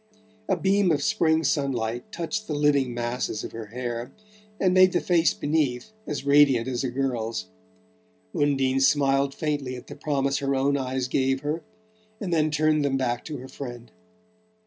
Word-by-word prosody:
A 190 - +2
beam 195 +1 +2
of 145 -2 +1
spring 160 -5 +2
sunlight 125 -5 -1
touched 215 +6 -4
the 150 - -2
living 145 -3 +2
masses 120 -2 -3
of - - -6
her 115 -1 -7
hair 120 +2 -5 0.5
and 185 -2 +3
made 185 0 +6
the - - +3
face 170 -2 +3
beneath 145 +2 -1 0.2
as 145 -2 -4
radiant 140 -4 +5
as 130 0 -2
a 130 - -1
girl's. 120 - -2 0.8
Undine 135 -5 +1
smiled 135 0 +3
faintly 145 -5 -2
at 125 - -10
the - - -10
promise 140 -2 0
her 140 -1 0
own 140 +1 +2
eyes 130 -1 -2
gave 135 +1 +1
her, 150 +3 -2 0.6
and 185 -5 -3
then 155 -1 +2
turned 155 0 +2
them 135 -1 +1
back 120 -2 -1
to 155 -2 -5
her 130 +1 -9
friend. 120 -3 -8
140 Hz, 170 wpm, -25 LUFS, 125-155 Hz, 0.8 s, made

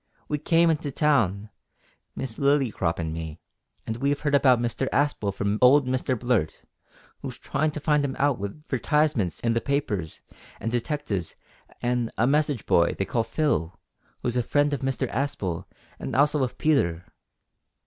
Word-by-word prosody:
We 150 - -1
came 165 +2 +4
in 160 - +1
to 150 -2 -5
town, 110 - +1 0.6
Miss 120 -5 -5
Lillycrop 135 - +1
an' 80 -1 -2
me, 80 -1 -6 0.5
and 110 - -3
we've 140 +3 0
heard 145 -1 -1
about 130 -3 +5
Mr 120 +3 -1
Aspel 140 -8 +1
from 100 +2 -1
old 135 +2 +6
Mr 130 0 0
Blurt, 120 -10 0 0.6
who's - - -6
tryin' 155 +1 -1
to 150 - -5
find 150 -1 +2
him 135 -2 -2
out 140 -3 +2
with 100 +10 -7
'vertisements 145 - +1
in 115 -1 +1
the 115 - 0
papers 110 - -2 0.4
an' 115 - -2
detectives 120 - -2 0.5
an' 120 -1 0
a 115 - +3
message 145 -2 +1
boy 85 0 +3
they 95 - 0
call 115 +2 0
Phil, 105 - -1 0.4
who's 120 -1 -1
a 125 - +2
friend 145 +4 +1
of 140 - -1
Mr 135 -1 -1
Aspel, 105 -10 -2 0.3
an' - - -4
also 145 +2 +3
of 125 - -3
Peter." 90 - +1
130 Hz, 165 wpm, -26 LUFS, 105-145 Hz, 0.6 s, old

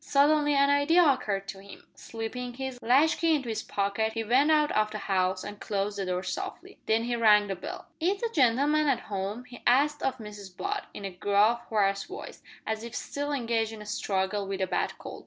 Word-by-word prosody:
Suddenly 290 +1 +3
an 280 0 +4
idea 320 +5 +4
occurred 210 -8 0
to 195 - -6
him. 200 0 -13
Slipping 240 +2 -6
his 265 -1 -5
latchkey 315 +6 +3
into 270 -5 -3
his 220 - -2
pocket 205 +2 -1
he 225 0 -2
went 255 +7 +3
out 300 -1 +3
of 215 0 +2
the 215 - -5
house 185 -2 0
and 205 0 -8
closed 205 0 -2
the 195 - -2
door 180 0 -1
softly. 180 - -6
Then 225 +1 +2
he 240 0 -1
rang 210 -3 +5
the 195 -1 -3
bell. 180 - -7
"Is 375 +5 +1
the 465 -1 -2
gen'leman 290 +3 +3
at 260 -5 -1
'ome?" 200 +5 -3
he 245 -1 -12
asked 290 +4 +3
of 260 -1 -1
Mrs 205 -4 -10
Butt, 410 +1 -3
in 200 - -6
a 195 - -4
gruff, 205 +5 +2
hoarse 200 -2 +1
voice, 390 +2 -9 0.2
as 220 0 -3
if 235 -1 -8
still 285 +1 -3
engaged 230 -5 -1
in 215 - -9
a - - -14
struggle 200 -1 -1
with 195 0 -3
a - - +3
bad - - -2
cold. - - -9
225 Hz, 210 wpm, -28 LUFS, 200-280 Hz, 0.2 s, rang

